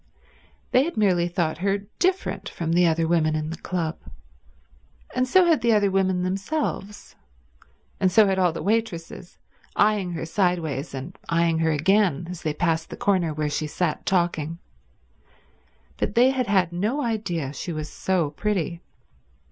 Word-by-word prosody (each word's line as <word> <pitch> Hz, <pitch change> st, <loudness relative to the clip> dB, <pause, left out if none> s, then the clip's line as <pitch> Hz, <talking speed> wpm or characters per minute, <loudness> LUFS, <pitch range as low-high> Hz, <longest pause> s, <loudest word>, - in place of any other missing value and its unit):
They 255 Hz, -, +5 dB
had 335 Hz, -4 st, -4 dB
merely 180 Hz, -5 st, +3 dB
thought 170 Hz, -3 st, -1 dB
her 195 Hz, +2 st, +1 dB, 0.2 s
different 370 Hz, +2 st, 0 dB
from 165 Hz, -1 st, -3 dB
the 175 Hz, 0 st, +4 dB
other 165 Hz, 0 st, +1 dB
women 160 Hz, -2 st, +2 dB
in 155 Hz, 0 st, -2 dB
the 165 Hz, -, -5 dB
club, 170 Hz, -3 st, -3 dB, 1.1 s
and 255 Hz, -, +1 dB
so 370 Hz, +7 st, +5 dB
had 325 Hz, -6 st, +3 dB
the 235 Hz, -1 st, +3 dB
other 205 Hz, -2 st, +3 dB
women 190 Hz, -1 st, +1 dB
themselves, 195 Hz, +2 st, -3 dB, 0.8 s
and 185 Hz, -, +2 dB
so 215 Hz, +3 st, +6 dB
had 190 Hz, -1 st, +1 dB
all 180 Hz, -2 st, +3 dB
the 165 Hz, -, -6 dB
waitresses, 195 Hz, -5 st, -2 dB, 0.4 s
eyeing 205 Hz, -4 st, +2 dB
her 165 Hz, -1 st, -4 dB
sideways 165 Hz, -6 st, -1 dB
and 140 Hz, +8 st, -7 dB
eyeing 165 Hz, -1 st, +2 dB
her 160 Hz, 0 st, +2 dB
again 170 Hz, +1 st, +2 dB
as 180 Hz, -, -7 dB
they 155 Hz, -, -1 dB
passed 165 Hz, +1 st, -1 dB
the -, -, -8 dB
corner 185 Hz, -5 st, +1 dB
where 150 Hz, 0 st, -2 dB
she 150 Hz, +1 st, -2 dB
sat 160 Hz, +1 st, -2 dB
talking; 170 Hz, -3 st, 0 dB, 1.4 s
but -, -, -2 dB
they 250 Hz, +3 st, +5 dB
had 255 Hz, -2 st, -1 dB
had 185 Hz, -4 st, +2 dB
no 220 Hz, +11 st, -1 dB
idea 175 Hz, -, -2 dB
she 170 Hz, -, -5 dB
was 155 Hz, -1 st, -4 dB
so 175 Hz, -3 st, -1 dB
pretty. 175 Hz, -1 st, -2 dB
180 Hz, 160 wpm, -24 LUFS, 160-205 Hz, 1.4 s, so